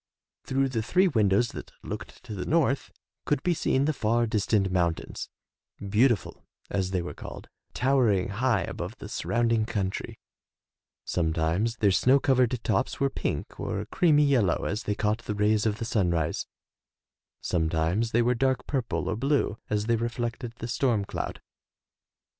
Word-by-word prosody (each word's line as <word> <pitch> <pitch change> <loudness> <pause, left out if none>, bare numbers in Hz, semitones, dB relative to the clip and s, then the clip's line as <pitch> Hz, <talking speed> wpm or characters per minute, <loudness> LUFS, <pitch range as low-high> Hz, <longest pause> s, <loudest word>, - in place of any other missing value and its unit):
Through 135 0 +1
the 115 -3 -1
three 185 - +3
windows 110 - +3
that - - -9
looked 100 +5 -7
to 120 -3 -7
the 95 - -4
north 145 -4 +1 0.3
could - - 0
be 175 - +2
seen 140 -3 +1
the 155 - +1
far 120 -1 +1
distant 105 -3 +1
mountains 85 -3 -1 0.6
Beautiful, 115 -1 +2 0.3
as 95 -2 0
they 90 -2 -1
were 90 - -5
called, - - -9 0.3
towering 125 -9 +2
high 115 +1 +1
above 90 +8 -5
the 105 - -8
surrounding 115 0 +1
country; 95 -4 -3 0.9
sometimes 85 +6 0
their 105 -3 +3
snow 130 +8 +4
covered 125 -3 +2
tops 105 -3 0
were 140 0 +1
pink - - -4
or 100 +2 -3
creamy 160 -6 +4
yellow 120 -11 +2
as 105 - -2
they 105 - 0
caught 105 +2 0
the 105 - -2
rays 105 +1 +2
of 105 -1 0
the 115 - -4
sunrise; 85 -9 0 0.9
sometimes 80 +6 0
they 120 +1 +2
were 120 +1 +3
dark 130 +1 0
purple 130 -5 -2
or - - 0
blue 135 -3 0
as 105 0 0
they 115 0 +2
reflected 115 0 -3
the 115 - -6
storm 120 -4 +1
cloud. - - -5
110 Hz, 155 wpm, -27 LUFS, 100-125 Hz, 0.9 s, snow